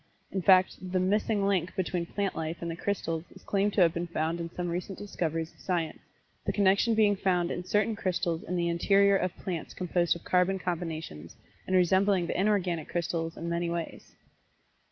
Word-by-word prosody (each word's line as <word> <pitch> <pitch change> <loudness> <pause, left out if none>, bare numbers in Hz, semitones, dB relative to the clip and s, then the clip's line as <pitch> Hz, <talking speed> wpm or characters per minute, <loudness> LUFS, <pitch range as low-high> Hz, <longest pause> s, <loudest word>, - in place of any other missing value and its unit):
In 190 - -1
fact, 185 0 +5
the 185 0 -1
"missing 205 +2 +1
link" 185 -3 0
between 175 -2 -1
plant 200 0 -2
life 160 +1 -3
and 170 -1 -4
the - - -4
crystals 165 -4 -2
is 190 - -15
claimed 200 0 +1
to 200 - +3
have 165 -2 +5
been 170 +1 -3
found 165 0 -1
in 170 0 -4
some 175 +1 -4
recent 180 +2 -4
discoveries 165 -5 -3
of - - -27
Science, 170 -4 -2 0.4
the - - 0
connection 200 +3 +3
being 210 -2 +4
found 180 -3 +1
in 175 - -3
certain 210 +4 +1
crystals 175 -4 -1
in 180 - -4
the 170 -1 +1
interior 195 +4 +4
of 185 -2 -1
plants 175 -5 -5
composed 175 -1 +1
of 170 - -10
carbon 180 +1 +2
combinations, 160 - -5 0.3
and 185 - +1
resembling 190 +1 +3
the - - -3
inorganic 185 -6 +1
crystals 165 -1 -2
in 170 - -5
many 170 0 -1
ways. 170 -1 -5
180 Hz, 190 wpm, -29 LUFS, 170-195 Hz, 0.4 s, fact